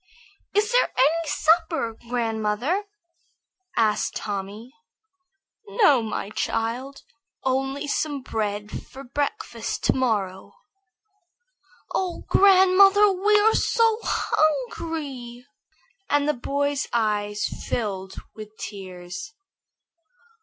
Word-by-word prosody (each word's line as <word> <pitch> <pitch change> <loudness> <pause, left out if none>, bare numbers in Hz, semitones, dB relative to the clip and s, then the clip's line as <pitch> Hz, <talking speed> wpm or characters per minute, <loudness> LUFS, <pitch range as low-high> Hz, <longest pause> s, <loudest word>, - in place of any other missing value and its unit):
"Is 420 +2 +2
there - - +3
any 315 +5 +3
supper, 320 -7 +2
grandmother?" 235 - -1 0.9
asked 215 -2 +1
Tommy. 205 +4 -5 0.9
"No, 395 - +4
my 215 -2 -4
child, 245 +6 -3 0.4
only 270 +2 -1
some 290 -1 -2
bread 210 -3 -3 0.2
for 270 +1 -11
breakfast 290 - -3
to - - +3
morrow." 205 -7 -1 1.4
"Oh, 365 -2 -2
grandmother, 390 +1 +6
we 410 +3 +3
are 440 +1 +4
so 455 -1 +2
hungry!" 275 -4 -1 0.6
and 290 0 +2
the 300 - +3
boy's 285 +2 -1
eyes 210 -2 0
filled 195 -4 -3 0.2
with 215 0 -11
tears. 190 - -8
265 Hz, 90 wpm, -24 LUFS, 215-335 Hz, 1.4 s, grandmother